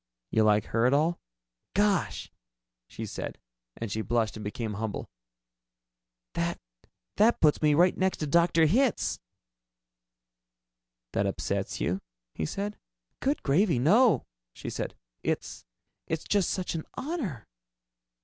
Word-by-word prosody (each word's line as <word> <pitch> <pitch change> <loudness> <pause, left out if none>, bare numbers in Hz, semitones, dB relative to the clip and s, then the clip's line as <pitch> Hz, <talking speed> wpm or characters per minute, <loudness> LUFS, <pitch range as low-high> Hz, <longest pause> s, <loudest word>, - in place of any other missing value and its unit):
"You 110 - +3
like 105 -1 +4
her 115 +2 +2
at 135 - +4
all?" 160 +4 +2 0.6
"Gosh 195 - +1 0.3
" - - -60
she - - -6
said, - - -5 0.4
and 115 -3 -4
she 110 - -1
blushed 115 -1 0
and 110 - -7
became 105 +1 -3
humble 105 0 -4 1.3
"that - - -1 0.6
that 225 +3 +5
puts 150 -2 +4
me 150 -1 +4
right 175 +3 +5
next 190 0 +1
to 155 - -2
Dr. 170 +2 +4
Hitz." 235 - +2 1.9
"That - - +1
upsets - - -2
you?" 90 +3 0 0.3
he 80 - -2
said. 205 +1 -4 0.4
"Good 280 +3 0
gravy, 165 - +3
no!" 210 - +5 0.3
she - - -6
said. - - -4 0.3
"It's - - -3 0.4
it's 160 0 -2
just 200 -3 +2
such 185 -2 -2
an 160 -2 -3
honor." 250 - -3
155 Hz, 130 wpm, -29 LUFS, -, 1.9 s, that